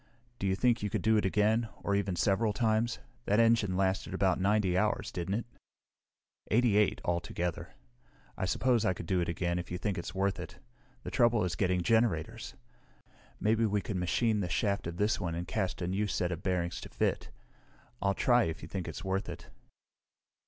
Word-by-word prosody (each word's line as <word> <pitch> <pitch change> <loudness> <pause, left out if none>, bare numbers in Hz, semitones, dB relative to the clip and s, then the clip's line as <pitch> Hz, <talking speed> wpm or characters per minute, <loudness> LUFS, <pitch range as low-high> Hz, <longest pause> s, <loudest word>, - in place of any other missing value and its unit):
Do 100 - -1
you 95 - +2
think 120 +2 +2
you 105 - -1
could - - -2
do 110 +1 +4
it 105 - +1
again, 110 +3 +2
or 100 - 0
even 100 -2 0
several 105 +4 +2
times? 115 +1 +1 0.3
That 105 +2 +2
engine 115 -5 +3
lasted 95 0 0
about 95 -1 +2
90 100 -1 +2
hours, 105 +3 0
didn't 90 +2 -2
it?" 115 - -2 1.0
"Eighty 115 -2 +3
eight, 105 -1 +2
altogether. 85 0 -2 0.6
I - - -2
suppose 120 +4 +2
I 95 -5 +1
could 85 - -7
do 95 +1 +1
it 85 - -1
again 85 +1 -1
if 90 - -6
you 90 - -3
think 95 0 -2
it's 85 - -6
worth 95 0 0
it. 90 - -8 0.5
The - - -6
trouble 120 -3 +3
is 90 -2 -1
getting 90 -1 +1
generators. 110 -7 0 0.8
Maybe 110 +2 +2
we 105 0 +1
could 100 -1 -4
machine 105 +5 +1
the 90 -3 -2
shaft 100 0 0
of 85 0 -5
this 105 +3 +1
one 85 -4 -2
and 85 +1 -4
cast 95 -3 -2
a - - -1
new 100 +3 0
set 90 -2 -1
of 85 0 -4
bearings 90 -2 -1
to - - -9
fit. - - -1 0.7
I'll 100 0 +1
try 120 -2 +4
if 80 -1 -5
you - - -6
think 95 0 -4
it's - - -6
worth 95 0 -2
it." - - -9
100 Hz, 195 wpm, -31 LUFS, 90-110 Hz, 1.0 s, do